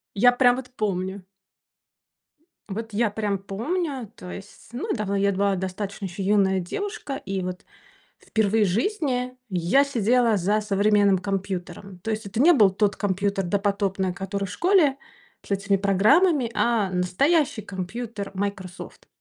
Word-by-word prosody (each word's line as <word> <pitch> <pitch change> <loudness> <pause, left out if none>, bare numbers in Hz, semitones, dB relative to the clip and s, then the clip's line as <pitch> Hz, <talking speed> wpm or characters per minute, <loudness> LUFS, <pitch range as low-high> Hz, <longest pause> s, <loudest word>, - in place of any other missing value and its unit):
Я 245 +5 +6
прям 245 0 +4
вот 255 -1 -7
помню. 190 -2 -2 1.5
Вот 225 +2 -5
я 225 +2 +2
прям 205 -2 -1
помню, 255 - -3
то 180 - -9
есть, 200 +2 -11
ну 255 - -4
да 210 - -2
вот 200 - -1
я 200 0 +2
была 200 0 +1
достаточно 195 +2 -4
ещё 190 +2 -5
юная 195 -1 +3
девушка. 345 - -4
И 195 -8 -4
вот 180 0 -5 0.5
впервые 220 0 +1
в - - +2
жизни 250 - -1
я 185 +9 +3
сидела 235 -3 +2
за 205 +4 +1
современным 205 -1 +3
компьютером. 190 -1 -5
То 220 +5 -4
есть 215 0 -3
это 215 +4 -2
не 345 +5 +7
был 210 - +6
тот 205 +1 0
компьютер 200 -1 -1
допотопный, 195 -1 0
который 195 +1 -4
в 185 - -7
школе 345 - +3 0.5
с - - -12
этими 200 0 +1
программами, 235 - +3
а 230 -5 +1
настоящий 245 - +1
компьютер 200 +2 -6
Microsoft. 190 -2 -6
200 Hz, 145 wpm, -24 LUFS, 195-240 Hz, 1.5 s, не